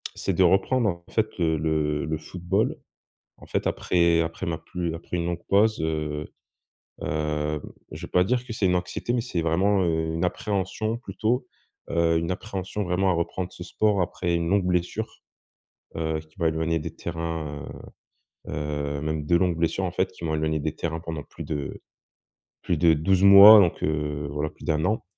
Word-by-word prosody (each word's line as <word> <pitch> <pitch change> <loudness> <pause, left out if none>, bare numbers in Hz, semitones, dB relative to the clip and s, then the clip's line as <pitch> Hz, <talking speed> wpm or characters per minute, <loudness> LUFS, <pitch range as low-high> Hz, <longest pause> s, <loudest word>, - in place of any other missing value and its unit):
c'est 95 - -1
de 95 - +3
reprendre 100 +6 +3
en 85 -1 -5
fait, 110 -1 +1
heu, 80 -2 +2
le 75 -1 0
le 80 0 -2
football, 90 +6 -1 0.6
en - - -14
fait, - - -1
après 85 -2 +2
après 85 +3 -3
ma 85 -1 -2
plus 85 -1 -4
après 85 +1 -5
une 85 - -1
longue 85 0 -3
pause, 110 +2 +3
heu, 75 -1 -2 0.7
hem, 75 0 -2 0.3
je - - -8
vais - - -14
pas 90 - +4
dire 125 +5 0
que 115 - -6
c'est 105 - 0
une 90 -1 +3
anxiété, 90 +6 -2
mais 120 - +1
c'est 115 -8 -2
vraiment, 95 +5 +2
heu, 80 -1 0
une 85 +2 0
appréhension, 100 +4 -2
plutôt, 115 +3 -2 0.4
heu, 85 0 +2
une 85 +2 -1
appréhension 100 +1 -4
vraiment 95 +2 +1
à - - +2
reprendre 85 +2 -2
ce 90 - -9
sport 100 +1 +1
après 85 0 -1
une 85 0 -1
longue 100 -1 +2
blessure, 90 +5 -2 0.8
heu, 80 -1 -1
qui 80 0 -20
m'a 85 - +2
éloignée 80 +1 0
des 75 - -6
terrains, 80 -4 -5 0.8
heu - - -6
heu, 75 -1 -3
même 75 0 -3
2 85 +2 +4
longues 90 -2 +1
blessures, 85 +3 0
en 90 - -1
fait, 95 - -1
qui 90 - -10
m'ont 80 -1 -1
éloignées 80 0 0
des 75 +1 -2
terrains 80 0 -3
pendant 80 -2 -5
plus - - -9
de 75 -3 -4 0.8
plus 85 - -1
de 80 +2 +5
12 90 +5 +2
mois, 100 +2 +11
donc 90 -4 +2
heu, 75 -1 -1
voilà, 75 +1 -2
plus - - -17
d'1 75 0 0
an, 110 - 0
85 Hz, 190 wpm, -25 LUFS, 80-95 Hz, 0.8 s, mois